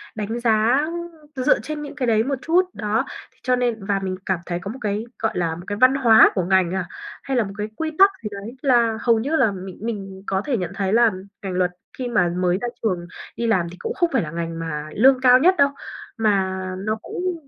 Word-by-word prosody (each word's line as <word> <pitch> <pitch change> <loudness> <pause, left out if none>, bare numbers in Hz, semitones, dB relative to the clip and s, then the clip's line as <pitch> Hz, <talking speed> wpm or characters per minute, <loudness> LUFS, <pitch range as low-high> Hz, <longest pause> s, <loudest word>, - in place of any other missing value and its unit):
đánh 215 +2 -3
giá 230 +3 +3 0.5
dựa 255 -1 +3
trên 305 -1 -5
những 290 -1 -8
cái 260 -4 -2
đấy 220 -1 +3
một 275 +3 -1
chút, 345 +6 +3
đó. 215 +4 -1 0.3
Thế - - -33
cho 250 0 +2
nên 240 -4 -1
và 200 -1 0
mình 190 -1 -3
cảm 190 -3 0
thấy 175 -1 -3
có 195 - -5
một 260 - -9
cái, 210 +1 -2
gọi - - 0
là, 165 -2 0
một 175 - -9
cái 205 - -3
văn 255 +1 +6
hóa 235 -5 +6
của 185 - +1
ngành 185 -2 +2
à, 190 -2 -1 0.4
hay 270 -2 -1
là 235 - +3
một 195 -1 -7
cái 210 0 -2
quy 320 +3 -3
tắc 395 +1 +8
gì 210 - -3
đấy 205 +4 -8
là 235 -5 +3
hầu 230 -2 +3
như 285 +8 -1
là 255 -8 +3
mình 190 -1 -8
mình 195 -4 -5
có 190 0 0
thể 270 -5 0
nhận 180 -3 -3
thấy 195 0 -1
là 235 0 +5 0.3
ngành 190 -2 -3
luật 180 0 +1 0.3
khi 255 - -3
mà 210 -8 +2
mới 180 0 +1
ra 245 - -1 0.2
trường 180 -5 -1 0.3
đi 235 - -2
làm 185 -6 +2
thì - - -10
cũng - - -3
không 345 -3 +1
phải 260 - +3
là 150 - -5
ngành 165 0 -4
mà 155 -2 -4
lương 260 +4 +5
cao 250 -1 +7
nhất 365 +7 +5
đâu, 280 -2 +5 0.5
mà 195 -4 +1 0.2
nó 215 +3 -1
cũng 350 -2 -4
220 Hz, 245 wpm, -22 LUFS, 190-255 Hz, 0.5 s, tắc